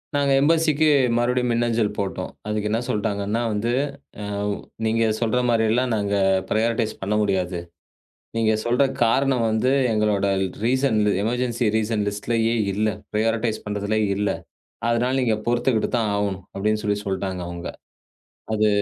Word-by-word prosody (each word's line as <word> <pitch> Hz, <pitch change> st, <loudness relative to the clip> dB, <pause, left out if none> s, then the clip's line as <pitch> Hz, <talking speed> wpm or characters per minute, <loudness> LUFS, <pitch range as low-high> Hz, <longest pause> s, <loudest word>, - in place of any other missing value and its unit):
நாங்க 140 Hz, -1 st, +2 dB
எம்பசிக்கு 155 Hz, +1 st, +3 dB, 0.3 s
மறுபடியும் 125 Hz, 0 st, +1 dB
மின்னஞ்சல் 115 Hz, -2 st, +1 dB
போட்டோம். 100 Hz, -2 st, -3 dB, 0.2 s
அதுக்கு 105 Hz, 0 st, -1 dB
என்ன 110 Hz, +2 st, +1 dB
சொல்லிட்டாங்கன்னா 105 Hz, -1 st, -1 dB
வந்து, 105 Hz, +3 st, -1 dB, 0.5 s
அ -, -, -4 dB, 0.6 s
நீங்கச் 110 Hz, -1 st, +1 dB
சொல்ற 115 Hz, +1 st, +1 dB
மாதிரி 115 Hz, -1 st, +3 dB
எல்லாம் 125 Hz, +2 st, +1 dB
நாங்க 100 Hz, -1 st, 0 dB, 0.3 s
ப்ரியாரடைஸ் 115 Hz, 0 st, +1 dB
பண்ண 100 Hz, +2 st, -1 dB
முடியாது. 95 Hz, -3 st, 0 dB, 0.8 s
நீங்கச் 110 Hz, -1 st, +2 dB
சொல்ற 120 Hz, +3 st, +3 dB, 0.2 s
காரணம் 130 Hz, +1 st, +2 dB
வந்து 110 Hz, +4 st, +1 dB, 0.2 s
எங்களோட 105 Hz, -2 st, +1 dB, 0.4 s
ரீசன் 130 Hz, -1 st, +2 dB, 0.3 s
எமெர்ஜின்சி 120 Hz, 0 st, 0 dB
ரீசன் 110 Hz, -1 st, 0 dB
லிஸ்ட்லயே 115 Hz, +3 st, 0 dB, 0.2 s
இல்ல. 105 Hz, +2 st, +1 dB, 0.2 s
ப்ரியாரடைஸ் 110 Hz, +1 st, 0 dB
பண்றது 105 Hz, +1 st, -1 dB, 0.2 s
இல்லை. 105 Hz, 0 st, 0 dB, 0.6 s
அதனால 120 Hz, +2 st, +1 dB
நீங்கப் 110 Hz, -3 st, 0 dB
பொறுத்துக்கிட்டு 120 Hz, -1 st, +1 dB
தான் 110 Hz, -3 st, 0 dB
ஆகணும். 100 Hz, -3 st, -2 dB
அப்படின்னு 105 Hz, +2 st, 0 dB
சொல்லிச் 105 Hz, 0 st, -1 dB
சொல்லிட்டாங்க 95 Hz, -1 st, -2 dB
அவங்க. 85 Hz, 0 st, -6 dB, 0.9 s
அது 110 Hz, 0 st, +3 dB
110 Hz, 130 wpm, -23 LUFS, 105-120 Hz, 0.9 s, எம்பசிக்கு